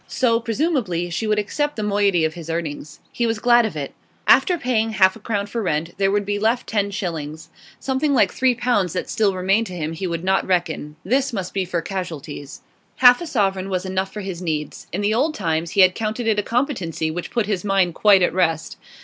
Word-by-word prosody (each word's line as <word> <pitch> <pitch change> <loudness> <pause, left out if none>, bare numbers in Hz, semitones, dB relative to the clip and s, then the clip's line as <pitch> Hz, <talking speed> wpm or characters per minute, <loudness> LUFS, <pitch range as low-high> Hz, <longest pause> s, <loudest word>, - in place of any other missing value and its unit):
So, 230 -3 +1
presumably, 225 - -1
she 220 +6 -2
would 210 0 +2
accept 290 +8 -1
the 215 - -3
moiety 200 -5 +2
of 160 - -1
his 165 -1 -9
earnings; 155 -2 -5
he 235 - -1
was 225 -1 0
glad 240 0 +4
of 200 - -8
it. 140 -2 -5 0.3
After 360 -2 +5
paying 225 -6 0
half 190 -2 +4
a - - -12
crown 205 -2 -2
for 230 +3 -4
rent, 165 -3 -2
there 195 -1 +3
would 205 0 0
be 205 0 -1
left 225 +3 +1
ten 205 -2 0
shillings. 160 -7 -5 0.3
Something 275 +2 0
like 205 -6 +3
three 255 -1 +2
pounds 230 -8 0
that 185 - -3
still 205 -3 +1
remained 195 +5 +1
to 185 - -8
him 160 -1 -3
he 185 +3 -4
would 170 -1 -3
not 190 +1 +1
reckon; 170 -5 -1
this 265 +6 +1
must 190 -5 -4
be 195 -1 -1
for 175 -2 -2
casualties. 155 -7 -6 0.3
Half 250 +2 +6
a 345 - -5
sovereign 195 -8 0
was 185 -1 -2
enough 190 +1 -2
for 210 - -6
his 190 -3 -6
needs; 155 -4 -4
in 190 - -2
the 205 +1 +1
old 290 +7 +1
times 165 -3 -2
he - - +7
had 185 0 +6
counted 220 +3 -3
it 220 -2 +2
a - - +2
competency 205 - -1
which 175 +2 -5
put 235 -3 0
his 200 -3 -2
mind 195 -4 +2
quite 200 0 +5
at 175 - +2
rest. 165 -4 0
195 Hz, 225 wpm, -21 LUFS, 175-225 Hz, 0.3 s, he